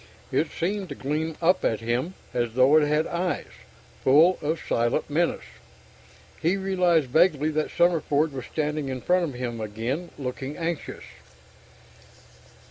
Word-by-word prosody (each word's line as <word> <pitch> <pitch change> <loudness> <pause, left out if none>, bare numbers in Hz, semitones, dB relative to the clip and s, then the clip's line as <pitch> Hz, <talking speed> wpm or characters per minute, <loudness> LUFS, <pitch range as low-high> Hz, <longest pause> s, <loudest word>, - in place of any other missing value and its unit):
It - - +1
seemed 195 +2 -3
to - - -6
gleam 155 +3 -3
up 180 +2 +3
at 110 - +1
him, 120 +10 -2 0.2
as 120 -2 -1
though 130 +4 +5
it 155 -1 +5
had 150 +1 +2
eyes, 175 +1 -2 0.5
full 160 +7 +5
of 155 +2 -1
silent 120 +4 -1
menace. 170 +3 0 1.0
He 175 +5 +2
realized 180 -5 +2
vaguely 155 -1 +3
that 155 0 -1
Summerford 160 -3 +2
was 130 -3 -6
standing 150 -2 -2
in 130 -1 -4
front 180 +4 +2
of 140 -6 -6
him 120 -2 -4
again, 115 +11 -3
looking 135 +1 -5
anxious. 170 -2 -4
155 Hz, 140 wpm, -25 LUFS, 130-170 Hz, 1.0 s, though